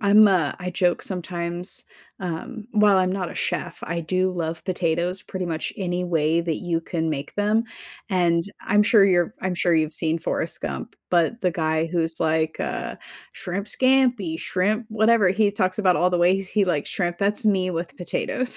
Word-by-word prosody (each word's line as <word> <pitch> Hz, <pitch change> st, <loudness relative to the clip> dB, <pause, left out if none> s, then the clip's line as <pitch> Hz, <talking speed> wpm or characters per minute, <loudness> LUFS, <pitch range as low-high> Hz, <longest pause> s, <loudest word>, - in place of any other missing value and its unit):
I'm 210 Hz, +1 st, +6 dB
a 170 Hz, -7 st, +1 dB
I 180 Hz, 0 st, -4 dB
joke 180 Hz, -1 st, +1 dB
sometimes, 175 Hz, -1 st, -4 dB, 0.4 s
um 185 Hz, +6 st, -5 dB
while 210 Hz, -3 st, +5 dB
I'm 185 Hz, 0 st, +1 dB
not 185 Hz, -3 st, -3 dB
a -, -, -9 dB
chef, 175 Hz, -, -3 dB
I 170 Hz, +2 st, -3 dB
do 185 Hz, +3 st, 0 dB
love 165 Hz, -2 st, -4 dB
potatoes 175 Hz, 0 st, -1 dB
pretty 190 Hz, -3 st, -5 dB
much 160 Hz, -1 st, -3 dB
any 180 Hz, -2 st, -2 dB
way 165 Hz, -1 st, +1 dB
that 165 Hz, -2 st, -2 dB
you 170 Hz, -2 st, -2 dB
can 160 Hz, -1 st, -2 dB
make 145 Hz, -1 st, -5 dB
them. 210 Hz, +3 st, +2 dB, 0.4 s
And, 170 Hz, -3 st, +2 dB, 0.2 s
I'm 210 Hz, +1 st, +4 dB
sure 210 Hz, -1 st, +5 dB
you're 180 Hz, +2 st, +2 dB
I'm 185 Hz, -1 st, -1 dB
sure 175 Hz, -1 st, +2 dB
you've 155 Hz, -1 st, +1 dB
seen 165 Hz, 0 st, 0 dB
Forrest -, -, -2 dB
Gump, -, -, -5 dB
but 180 Hz, +7 st, +2 dB
the 180 Hz, -, +3 dB
guy 160 Hz, -1 st, 0 dB
who's 165 Hz, -1 st, -1 dB
like, 160 Hz, 0 st, +1 dB
uh, -, -, -3 dB, 0.4 s
"Shrimp 195 Hz, +2 st, -4 dB
Scampi, 250 Hz, -10 st, +2 dB
shrimp 215 Hz, +5 st, 0 dB
whatever." 220 Hz, -2 st, +4 dB
He 205 Hz, +2 st, +2 dB
talks 185 Hz, -1 st, 0 dB
about 185 Hz, -4 st, +3 dB
all 180 Hz, -, +3 dB
the 175 Hz, -, +1 dB
ways 190 Hz, +2 st, +2 dB
he 205 Hz, -2 st, +2 dB
likes 150 Hz, -6 st, -1 dB
shrimp. 175 Hz, -2 st, -1 dB
That's 205 Hz, +2 st, +1 dB
me 185 Hz, -3 st, +2 dB
with 170 Hz, 0 st, -4 dB
potatoes. 250 Hz, +7 st, -2 dB
180 Hz, 185 wpm, -23 LUFS, 170-200 Hz, 0.4 s, I'm